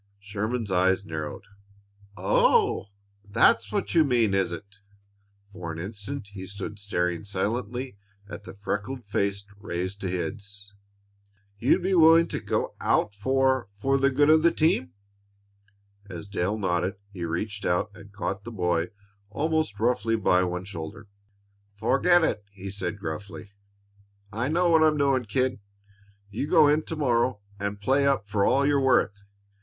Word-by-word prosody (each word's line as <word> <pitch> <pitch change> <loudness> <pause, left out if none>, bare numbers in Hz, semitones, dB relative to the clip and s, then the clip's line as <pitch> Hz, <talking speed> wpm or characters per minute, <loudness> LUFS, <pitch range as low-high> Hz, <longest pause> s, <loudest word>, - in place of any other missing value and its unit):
Sherman's 105 +2 -3
eyes 95 +2 +2
narrowed. 80 -3 -5 0.7
"Oh, 95 +2 +3 0.4
that's 100 +1 +3
what - - -2
you 165 -2 +6
mean, 120 -7 +2
is 95 -3 +1
it?" 100 +4 -9 0.7
For 85 -3 -6
an 80 - -7
instant 105 +6 -6
he 95 -2 -8
stood 100 +1 -7
staring 90 -4 -1
silently 110 +4 -3 0.3
at 100 - -8
the - - -10
freckled 105 +5 -4
face 100 0 -1
raised 95 +1 -4
to 95 - -2
his. 100 +3 -5 0.9
"You'd 135 +9 +3
be 190 +1 +1
willing 165 -1 +6
to - - -3
get - - -1 0.2
out 105 - +1
for 130 +3 +1
for 135 +7 +1
the 135 0 +4
good 145 +3 +4
of 160 0 +6
the 170 - +5
team?" 90 - +1 1.2
As 90 +1 -7
Dale 100 +1 -1
nodded 95 0 0 0.2
he 90 -3 -6
reached 100 +5 -3
out 90 +4 0
and 100 -1 -14
caught 100 -1 -4
the 120 - -7
boy 90 -4 0 0.4
almost 155 -3 -1
roughly 115 -1 +1
by 90 -4 +3
one 90 0 -3
shoulder. 100 +3 -8 0.7
"Forget 160 - +3
it!" 105 -9 0
he 100 -1 -8
said 100 -1 -4
gruffly. 100 +3 -7 0.8
"I 115 +4 -1
know 170 +3 +2
what 160 -1 +5
I'm 155 -1 +4
doing, 135 -3 +2
kid. 125 +4 0 0.7
You 115 +8 -3
go 150 - +6
in 150 +2 +3
to 160 - -4
morrow 120 -6 +1 0.2
and 100 0 -3
play 135 +6 +2
up 135 -7 +1
for 100 0 0
all 135 +6 +3
you're 140 -1 +3
worth. 110 -6 +2
105 Hz, 150 wpm, -26 LUFS, 95-130 Hz, 1.2 s, you